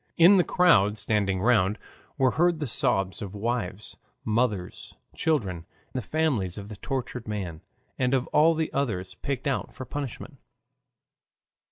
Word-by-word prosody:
In 180 +4 +8
the 180 - +5
crowd 110 - +4
standing 100 -3 0
round 105 -3 +3 0.4
were 130 -3 +3
heard 175 +3 +2
the 150 - -2
sobs 115 - +1
of 100 -1 -6
wives, 105 -2 -3 0.3
mothers, 110 -5 -1 0.2
children, 95 - -1 0.3
the 130 - -2
families 120 - -1
of 100 0 -8
the 105 - -7
tortured 125 -2 -4
man 95 -7 -4 0.4
and 125 0 +2
of 130 -1 0
all 160 +2 +4
the 160 0 -2
others 110 -10 -2
picked 140 0 -4
out 140 -2 -2
for 130 - -7
punishment. 140 -1 -6
120 Hz, 145 wpm, -26 LUFS, 100-140 Hz, 0.4 s, In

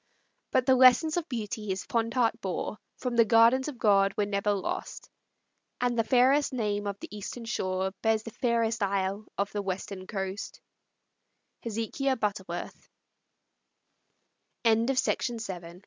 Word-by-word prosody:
But 255 -1 +2
the 260 - +5
lessons 260 +5 +6
of 350 -1 -2
beauty 215 -3 -4
his 190 -1 -3
fond 230 +1 -1
heart 240 -3 +1
bore 190 +2 -3 0.2
From 250 -2 -3
the 230 - +6
gardens 230 +4 +5
of 290 -4 -6
God 195 -4 +3
were 210 - +2
never 200 0 0
lost; 200 -2 -4 0.7
And 245 -1 +1
the 230 - +2
fairest 260 +4 +3
name 205 -4 -1
of 200 0 -4
the - - -9
Eastern 220 +3 -6
shore 190 -4 -1
Bears 220 -1 +2
the 225 - -8
fairest 230 -2 0
isle 195 +1 -1
of 200 0 -1
the 205 - -2
Western 190 0 -5
coast. 195 0 -5
220 Hz, 125 wpm, -28 LUFS, 200-245 Hz, 0.7 s, lessons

